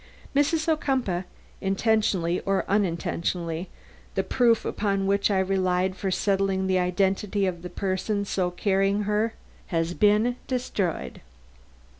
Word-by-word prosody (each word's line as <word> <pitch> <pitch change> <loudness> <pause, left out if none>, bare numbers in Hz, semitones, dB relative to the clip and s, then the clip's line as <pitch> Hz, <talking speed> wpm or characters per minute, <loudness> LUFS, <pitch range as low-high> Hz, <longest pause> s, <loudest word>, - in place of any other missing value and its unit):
Mrs. 310 +3 +2
Ocumpaugh, 260 - 0 0.4
intentionally 195 -3 +1
or 195 0 0
unintentionally, 175 -2 -1 0.5
the - - +1
proof 235 -3 +2
upon 195 -2 0
which 200 +1 +2
I 200 - +2
relied 185 -1 +1
for 195 - -2
settling 195 0 +1
the 185 -1 +2
identity 195 +2 +1
of 175 -2 -2
the 180 - -6
person 200 +3 -1
so 185 -2 0
carrying 195 +2 +1
her 210 +2 0 0.3
has 165 0 -1
been 215 +5 +3
destroyed." 230 -9 -2
195 Hz, 120 wpm, -26 LUFS, 185-210 Hz, 0.5 s, been